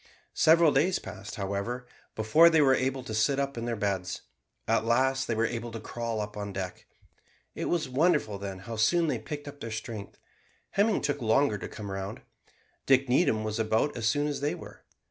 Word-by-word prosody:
Several 165 Hz, 0 st, +5 dB
days 165 Hz, +8 st, +2 dB
passed, 100 Hz, 0 st, -8 dB
however, 100 Hz, +5 st, -3 dB, 0.3 s
before 150 Hz, +11 st, +6 dB
they 160 Hz, -1 st, +4 dB
were 135 Hz, -3 st, +5 dB
able 130 Hz, 0 st, 0 dB
to 110 Hz, -, -6 dB
sit 110 Hz, +6 st, +2 dB
up 140 Hz, 0 st, -1 dB
in 115 Hz, 0 st, -4 dB
their 120 Hz, -1 st, -1 dB
beds. 100 Hz, -3 st, -2 dB, 0.4 s
At 115 Hz, 0 st, +2 dB
last 130 Hz, +3 st, +2 dB
they 115 Hz, -, 0 dB
were 115 Hz, +1 st, +2 dB
able 115 Hz, 0 st, -4 dB
to 115 Hz, -, -5 dB
crawl 115 Hz, 0 st, -4 dB
up 105 Hz, 0 st, -6 dB
on 100 Hz, -1 st, -4 dB
deck. 95 Hz, -2 st, -6 dB, 0.7 s
It -, -, -4 dB
was 165 Hz, -4 st, 0 dB
wonderful 130 Hz, -, +1 dB
then 100 Hz, -1 st, -5 dB
how 115 Hz, -1 st, -5 dB
soon 170 Hz, +11 st, +3 dB
they 155 Hz, -, -1 dB
picked 145 Hz, -2 st, -7 dB
up 145 Hz, 0 st, -9 dB
their 115 Hz, -, -5 dB
strength. 110 Hz, -1 st, -6 dB, 0.5 s
Hemming 205 Hz, +1 st, +2 dB
took 145 Hz, -1 st, -1 dB
longer 110 Hz, -1 st, +2 dB
to -, -, -5 dB
come 100 Hz, -2 st, -7 dB
round. 95 Hz, 0 st, -5 dB, 0.6 s
Dick 135 Hz, -1 st, +4 dB
Needham 125 Hz, -5 st, +3 dB
was 110 Hz, +1 st, -3 dB
about 110 Hz, +6 st, +1 dB
as 115 Hz, -3 st, -1 dB
soon 145 Hz, +5 st, +2 dB
as 145 Hz, -2 st, -2 dB
they 145 Hz, +1 st, 0 dB
were. -, -, -12 dB
120 Hz, 200 wpm, -29 LUFS, 110-145 Hz, 0.7 s, before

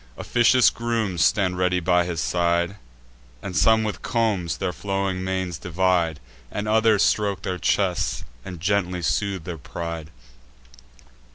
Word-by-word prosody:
Officious 120 Hz, +1 st, +4 dB
grooms 110 Hz, -8 st, -1 dB
stand 90 Hz, 0 st, +2 dB
ready 90 Hz, 0 st, +2 dB
by 90 Hz, 0 st, +2 dB
his 85 Hz, -2 st, -3 dB
side; 85 Hz, +2 st, 0 dB, 0.7 s
And 95 Hz, -2 st, -5 dB
some 110 Hz, +3 st, +4 dB
with 105 Hz, -4 st, -4 dB
combs 105 Hz, -8 st, 0 dB
their 90 Hz, -, -2 dB
flowing 95 Hz, -1 st, -2 dB
manes 95 Hz, -3 st, -2 dB
divide, 85 Hz, -3 st, 0 dB, 0.3 s
And 105 Hz, -, -4 dB
others 110 Hz, -1 st, +4 dB
stroke 100 Hz, -2 st, +1 dB
their 90 Hz, -1 st, -3 dB
chests 90 Hz, +1 st, 0 dB, 0.2 s
and 90 Hz, -2 st, -8 dB
gently 90 Hz, -1 st, 0 dB
soothe 100 Hz, +1 st, -1 dB
their 85 Hz, -1 st, -6 dB
pride. 85 Hz, +1 st, -6 dB
95 Hz, 130 wpm, -23 LUFS, 85-100 Hz, 0.7 s, Officious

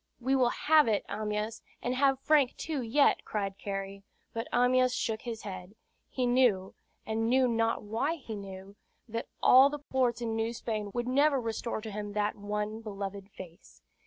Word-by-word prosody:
"We 260 Hz, +2 st, +1 dB
will 255 Hz, -2 st, +4 dB
have 305 Hz, +1 st, +4 dB
it, 215 Hz, -2 st, +1 dB
Amyas, 215 Hz, +1 st, -3 dB, 0.2 s
and 245 Hz, -, -2 dB
have 270 Hz, 0 st, +3 dB
Frank 290 Hz, -4 st, +3 dB
too, 310 Hz, -4 st, -3 dB
yet," 250 Hz, +5 st, +3 dB
cried 200 Hz, -2 st, -3 dB
Cary; 195 Hz, 0 st, -5 dB, 0.3 s
but 230 Hz, +1 st, -3 dB
Amyas 250 Hz, +1 st, +3 dB
shook 220 Hz, -1 st, -2 dB
his 230 Hz, -3 st, -6 dB
head. 185 Hz, 0 st, -8 dB, 0.3 s
He 255 Hz, -, -1 dB
knew, 245 Hz, -7 st, +2 dB, 0.3 s
and 225 Hz, +1 st, -1 dB
knew 260 Hz, +1 st, +4 dB
not 230 Hz, -1 st, 0 dB
why 225 Hz, +10 st, -1 dB
he 240 Hz, -8 st, -7 dB
knew, 195 Hz, 0 st, -9 dB, 0.3 s
that 230 Hz, +1 st, -4 dB, 0.2 s
all 265 Hz, +2 st, +8 dB
the 295 Hz, -, -4 dB
ports 260 Hz, -4 st, 0 dB
in 230 Hz, -2 st, -2 dB
New 225 Hz, +1 st, -1 dB
Spain 215 Hz, -3 st, -3 dB
would 240 Hz, 0 st, -1 dB
never 280 Hz, +2 st, +3 dB
restore 230 Hz, -1 st, -3 dB
to 220 Hz, 0 st, -7 dB
him 205 Hz, 0 st, -5 dB
that 210 Hz, 0 st, 0 dB
one 210 Hz, +2 st, -3 dB
beloved 200 Hz, -2 st, -6 dB
face. 180 Hz, -2 st, -13 dB
225 Hz, 175 wpm, -30 LUFS, 205-255 Hz, 0.3 s, all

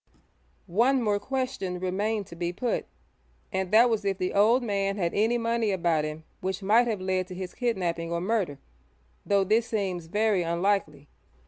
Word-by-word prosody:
One 240 Hz, +8 st, +2 dB
more 205 Hz, -2 st, +1 dB
question 255 Hz, -6 st, -3 dB
remained 200 Hz, +3 st, -1 dB
to 170 Hz, -, -11 dB
be 170 Hz, 0 st, -2 dB
put, 235 Hz, +7 st, -2 dB, 0.7 s
and 190 Hz, -1 st, -1 dB
that 225 Hz, +3 st, +7 dB
was 220 Hz, -3 st, 0 dB
if 195 Hz, -1 st, 0 dB
the 185 Hz, -1 st, -2 dB
old 225 Hz, +5 st, +4 dB
man 200 Hz, -2 st, -1 dB
had 170 Hz, -3 st, -1 dB
any 225 Hz, +4 st, +2 dB
money 230 Hz, -1 st, 0 dB
about 170 Hz, -5 st, +1 dB
him 155 Hz, +1 st, -6 dB, 0.2 s
which 190 Hz, +1 st, -3 dB
might 225 Hz, +5 st, +4 dB
have 220 Hz, -4 st, -1 dB
led 185 Hz, -1 st, -1 dB
to 185 Hz, -, -8 dB
his 185 Hz, -1 st, -6 dB
kidnapping 175 Hz, -9 st, -1 dB
or 170 Hz, -, 0 dB
murder, 185 Hz, -6 st, -1 dB, 0.7 s
though 200 Hz, -1 st, +3 dB
this 220 Hz, +4 st, +2 dB
seems 185 Hz, -6 st, -2 dB
very 210 Hz, +1 st, +2 dB
unlikely. 170 Hz, -4 st, -1 dB
195 Hz, 175 wpm, -27 LUFS, 180-225 Hz, 0.7 s, that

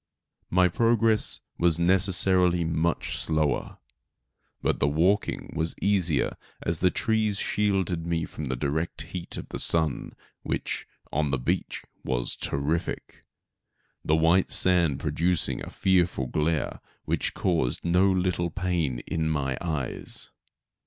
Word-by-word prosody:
My 90 Hz, +1 st, +4 dB
progress 115 Hz, +2 st, +2 dB, 0.2 s
was 85 Hz, -2 st, +3 dB
necessarily 90 Hz, 0 st, +4 dB
much 80 Hz, +1 st, -1 dB
slower, 80 Hz, -2 st, -1 dB, 0.9 s
but -, -, +1 dB
the -, -, +2 dB
walking 90 Hz, +8 st, 0 dB
was 80 Hz, +1 st, 0 dB
easier 90 Hz, -7 st, +1 dB, 0.3 s
as 80 Hz, 0 st, -1 dB
the 90 Hz, -, +4 dB
trees 110 Hz, 0 st, 0 dB
shielded 95 Hz, -6 st, 0 dB
me 85 Hz, -1 st, 0 dB
from 75 Hz, -, -7 dB
the 65 Hz, -1 st, -2 dB
direct 75 Hz, +4 st, -2 dB
heat 85 Hz, +2 st, -6 dB
of -, -, -7 dB
the -, -, -4 dB
sun, 80 Hz, -4 st, +1 dB, 0.3 s
which, -, -, -3 dB, 0.2 s
on 75 Hz, 0 st, 0 dB
the 70 Hz, -, 0 dB
beach 60 Hz, -, -2 dB, 0.2 s
was -, -, -1 dB
terrific, 75 Hz, +5 st, -3 dB, 0.8 s
the 80 Hz, -, +2 dB
white 85 Hz, +4 st, +3 dB
sand 85 Hz, -6 st, +4 dB
producing 85 Hz, 0 st, 0 dB
a -, -, -7 dB
fearful 90 Hz, -8 st, +1 dB
glare 75 Hz, +3 st, -1 dB, 0.3 s
which -, -, -1 dB
caused 85 Hz, -9 st, 0 dB
no 90 Hz, +3 st, +4 dB
little 90 Hz, -2 st, 0 dB
pain 85 Hz, -8 st, -2 dB
in 80 Hz, -1 st, -1 dB
my 70 Hz, -3 st, -1 dB
eyes. 75 Hz, -7 st, -4 dB
85 Hz, 125 wpm, -26 LUFS, 75-90 Hz, 0.9 s, My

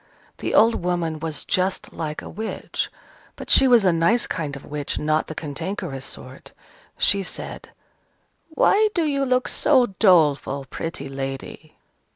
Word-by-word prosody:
The -, -, -2 dB
old 225 Hz, -3 st, +4 dB
woman 170 Hz, -3 st, -1 dB
was 160 Hz, -2 st, -5 dB
just 185 Hz, +1 st, -1 dB
like 155 Hz, -2 st, -4 dB
a -, -, -8 dB
witch: 220 Hz, +1 st, -4 dB, 0.5 s
but -, -, -7 dB
she 270 Hz, -, +7 dB
was 240 Hz, -5 st, +5 dB
a 180 Hz, -, +4 dB
nice 170 Hz, +9 st, +2 dB
kind 150 Hz, -5 st, -4 dB
of 140 Hz, -, -10 dB
witch, 145 Hz, -1 st, -4 dB
not 155 Hz, +1 st, 0 dB
the 155 Hz, -, -7 dB
cantankerous 160 Hz, -2 st, -4 dB
sort. 130 Hz, 0 st, -8 dB, 0.4 s
She 200 Hz, -, +2 dB
said, 190 Hz, -, -6 dB, 0.8 s
"Why 415 Hz, +6 st, +3 dB
do 340 Hz, -, +2 dB
you 280 Hz, -2 st, 0 dB
look 255 Hz, -1 st, +1 dB
so 255 Hz, -8 st, +3 dB
doleful, 150 Hz, -8 st, +3 dB
pretty 165 Hz, +1 st, -5 dB
lady?" 135 Hz, +3 st, -6 dB
165 Hz, 150 wpm, -23 LUFS, 150-220 Hz, 0.8 s, she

